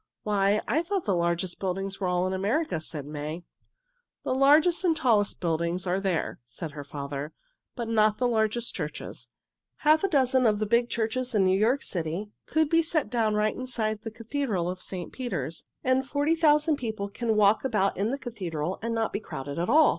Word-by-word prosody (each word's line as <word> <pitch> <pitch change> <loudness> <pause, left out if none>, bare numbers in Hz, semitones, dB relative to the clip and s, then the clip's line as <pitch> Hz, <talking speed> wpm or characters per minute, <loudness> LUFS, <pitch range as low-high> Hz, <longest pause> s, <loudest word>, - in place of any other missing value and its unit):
"Why, 205 0 +2
I 315 - +2
thought 375 +1 -2
the 200 - +1
largest 170 +1 -1
buildings 195 +1 -3
were 190 - -1
all 180 0 +1
in 185 - -1
America," 200 - 0
said 150 -3 -6
May. 150 +3 -5 0.8
"The - - 0
largest 300 +7 +5
and 330 -3 +2
tallest 215 -8 +3
business - - -36
buildings 170 +1 -1
are 185 +1 +1
there," 190 -4 -1
said 145 +7 -7
her 145 0 -7
father, 140 +1 -5 0.4
"but 235 -3 -4
not 215 -1 +3
the 250 - +2
largest 225 0 0
churches. - - -6 0.6
Half 310 +3 +5
a - - +4
dozen 260 -6 +3
of 210 -1 +3
the 215 - -1
big 235 +3 +2
churches 235 +2 -2
in 195 -2 +4
New 185 0 +4
York 230 +8 +2
City 175 +4 -3 0.2
could 315 0 +2
be 330 +2 +4
set 320 -3 -1
down 225 -3 +1
right 210 0 +1
inside 220 -4 -2
the 225 - -5
Cathedral 225 -5 -2
of 185 0 -8
St. 180 -2 -6
Peter's, 165 - -4 0.2
and 260 +1 +2
forty 285 +3 +1
thousand 300 -1 +3
people 220 -6 -3
can 220 +2 -1
walk 210 0 +4
about 210 -7 +1
in 200 +4 0
the 270 - -1
Cathedral 185 - -4
and 230 +1 -2
not 225 -1 -1
be - - -1
crowded 140 -7 -6
at 175 - -1
all." 310 0 +6
215 Hz, 200 wpm, -27 LUFS, 180-255 Hz, 0.8 s, all